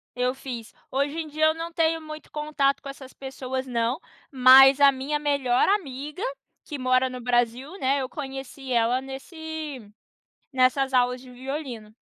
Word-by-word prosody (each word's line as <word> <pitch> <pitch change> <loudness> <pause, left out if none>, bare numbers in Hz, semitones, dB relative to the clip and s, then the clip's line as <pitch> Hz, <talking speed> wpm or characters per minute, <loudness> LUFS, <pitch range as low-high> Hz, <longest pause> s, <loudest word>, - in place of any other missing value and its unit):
Eu 250 0 0
fiz. 240 -4 -7 0.2
Hoje 280 +3 -1
em 320 -1 -3
dia 310 +1 +1
eu 315 - +4
não 330 +1 -6
tenho 325 0 +1
muito 310 0 -9
contato 300 -2 0
com 280 - -7
essas 270 -1 -10
pessoas 265 -1 -5
não, 235 +1 0 0.3
mas 265 +1 +8
a 280 - +8
minha 275 +3 -2
melhor 280 -4 +1
amiga 300 -3 -2 0.4
que 295 - -6
mora 255 0 +2
no 250 -1 -7
Brasil, 245 +4 0
né, 275 0 +1
eu 260 - -4
conheci 270 -2 -7
ela 235 +2 +2
nesse 310 +1 -7 0.7
nessas 265 +1 +2
aulas 250 0 +2
de 255 0 -14
violino. 255 -4 -6
270 Hz, 160 wpm, -25 LUFS, 255-295 Hz, 0.7 s, mas